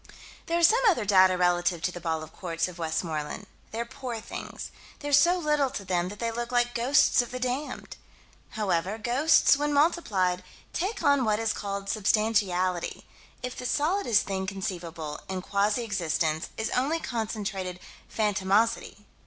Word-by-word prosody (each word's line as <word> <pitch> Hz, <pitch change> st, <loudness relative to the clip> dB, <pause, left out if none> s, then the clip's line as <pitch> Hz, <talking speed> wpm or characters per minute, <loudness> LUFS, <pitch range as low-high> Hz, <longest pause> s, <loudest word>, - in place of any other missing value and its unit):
There 335 Hz, -, +1 dB
are 345 Hz, -, 0 dB
some 450 Hz, +9 st, +6 dB
other 275 Hz, -, +1 dB
data 185 Hz, -2 st, +5 dB
relative 175 Hz, -1 st, +2 dB
to 180 Hz, -, +1 dB
the 175 Hz, -, -8 dB
ball 160 Hz, -2 st, -2 dB
of 155 Hz, -, -12 dB
quartz 165 Hz, -3 st, -2 dB
of 180 Hz, -1 st, -10 dB
Westmoreland. 160 Hz, +1 st, -3 dB, 0.2 s
They're 230 Hz, +1 st, -3 dB
poor 235 Hz, -1 st, -6 dB
things. -, -, -7 dB, 0.3 s
There's 290 Hz, -1 st, +3 dB
so 350 Hz, +3 st, +4 dB
little 300 Hz, -5 st, +1 dB
to 200 Hz, -, -6 dB
them 180 Hz, -1 st, 0 dB
that 205 Hz, -, -9 dB
they 230 Hz, +1 st, -2 dB
look 240 Hz, +1 st, -4 dB
like 240 Hz, 0 st, +2 dB
ghosts 245 Hz, +2 st, +4 dB
of 245 Hz, -, -6 dB
the 255 Hz, -, -5 dB
damned. 255 Hz, +4 st, -4 dB, 0.6 s
However, 195 Hz, -1 st, 0 dB
ghosts, 260 Hz, +6 st, +4 dB
when 295 Hz, +1 st, 0 dB
multiplied, 215 Hz, -, +2 dB, 0.3 s
take 385 Hz, +6 st, -2 dB
on 280 Hz, -2 st, +4 dB
what 215 Hz, -2 st, +2 dB
is 225 Hz, 0 st, 0 dB
called 200 Hz, -1 st, -4 dB
substantiality 200 Hz, -4 st, +1 dB, 0.4 s
if 250 Hz, 0 st, -4 dB
the 250 Hz, -, -4 dB
solidest 300 Hz, -, +2 dB
thing 190 Hz, -1 st, -3 dB
conceivable, 170 Hz, -6 st, -5 dB
in 185 Hz, -1 st, -3 dB
quasi 205 Hz, +4 st, +1 dB
existence, 165 Hz, -5 st, -1 dB
is 220 Hz, +1 st, -2 dB
only 285 Hz, +6 st, +1 dB
concentrated 210 Hz, -, -3 dB, 0.3 s
phantomosity. 205 Hz, 0 st, +1 dB
210 Hz, 160 wpm, -27 LUFS, 180-250 Hz, 0.6 s, some